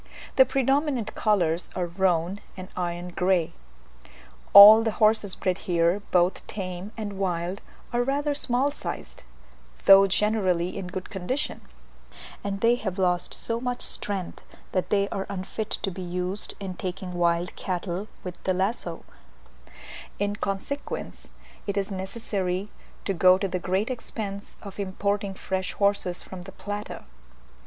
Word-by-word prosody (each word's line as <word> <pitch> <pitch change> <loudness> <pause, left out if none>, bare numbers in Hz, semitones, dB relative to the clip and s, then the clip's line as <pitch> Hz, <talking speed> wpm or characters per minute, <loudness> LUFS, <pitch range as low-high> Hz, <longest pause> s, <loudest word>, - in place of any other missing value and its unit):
The 265 - +8
predominant 270 -2 +1
colours 180 -6 +1
are 180 - 0
roan 175 +1 +1 0.2
and 185 0 -7
iron 175 0 -3
grey. 180 -2 +1 1.0
All 210 +2 +12
the 225 -1 0
horses 215 -3 +3
bred 185 0 -1
here, 170 +3 +3
both 180 +1 +2
tame 185 0 -5
and 205 -3 -5
wild, 180 +1 -1 0.3
are 240 - +2
rather 285 +3 0
small 275 0 +1
sized, 295 - -6 0.6
though 195 0 +9
generally 190 -3 +1
in 195 -2 -4
good 185 +1 -6
condition; 220 +9 -2 0.8
and 195 -1 -3
they 230 +1 +5
have 195 -6 -4
lost 180 -2 +1
so 230 0 -2
much 245 -1 -2
strength, 195 -4 -2 0.3
that 185 - -1
they 200 -1 +2
are 195 - -3
unfit 200 +3 -4
to 195 - -2
be 185 - -7
used 180 +2 -4
in 195 -2 -4
taking 180 0 -5
wild 175 0 +1
cattle 185 +2 -3 0.2
with 180 -1 -8
the 185 - +1
lazo: 195 +6 -1 1.1
in 205 0 -1
consequence, 205 +9 -4 0.4
it 200 - -1
is 200 +1 -1
necessary 190 -1 -3 0.4
to 195 - 0
go 185 +1 +6
to 195 +1 -1
the 185 -1 -2
great 190 +7 0
expense 205 -4 -5
of 200 0 -9
importing 200 0 -1
fresh 190 0 -3
horses 200 -3 +1
from 185 -1 -9
the 190 +2 -10
Plata. 205 +1 -6
195 Hz, 140 wpm, -26 LUFS, 180-210 Hz, 1.1 s, All